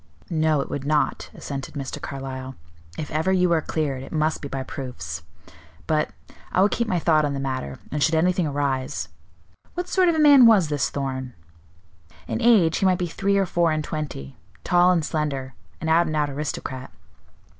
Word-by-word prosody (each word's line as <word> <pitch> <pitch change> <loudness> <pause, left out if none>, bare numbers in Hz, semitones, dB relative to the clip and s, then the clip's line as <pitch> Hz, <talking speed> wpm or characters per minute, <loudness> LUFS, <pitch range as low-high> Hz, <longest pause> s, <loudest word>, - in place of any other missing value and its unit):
"No, 155 -2 +2
it - - -6
would 140 - -3
not," 150 +1 0
assented 140 +1 -6
Mr. 135 -2 -5
Carlyle. 130 -1 -6 0.4
"If 150 - -5
ever 160 +5 +1
you 180 -2 +3
are 165 -2 +3
cleared, 145 -5 -2
it 135 - -10
must 155 0 0
be 140 - -5
by 135 -1 -4
proofs. 85 - -6 0.6
But 150 - +1 0.4
I - - +1
will 200 +2 +5
keep 235 +1 -1
my 185 - +1
thought 155 -2 +3
on 145 -1 -1
the - - -3
matter, 130 - -3
and 150 - -2
should 160 +3 +3
anything 180 +1 +2
arise 135 -9 -2 0.7
What 355 +1 -3
sort 365 -1 +3
of 335 - +2
a - - 0
man 285 -5 +8
was 195 -9 +5
this 145 -2 0
Thorn?" 130 -3 -4 0.9
"In - - -2
age 210 -9 +5
he - - +1
might 185 -1 +3
be 180 - -1
three 195 +4 0
or 195 - +3
four 170 -2 +1
and 155 0 -1
twenty, 145 - -5 0.3
tall 175 0 +4
and 170 -4 +1
slender; 140 -5 -2 0.3
an 160 - -4
out 165 +2 +4
and 155 - -2
out 150 -1 +1
aristocrat." 135 -2 -5
155 Hz, 190 wpm, -24 LUFS, 135-175 Hz, 0.9 s, man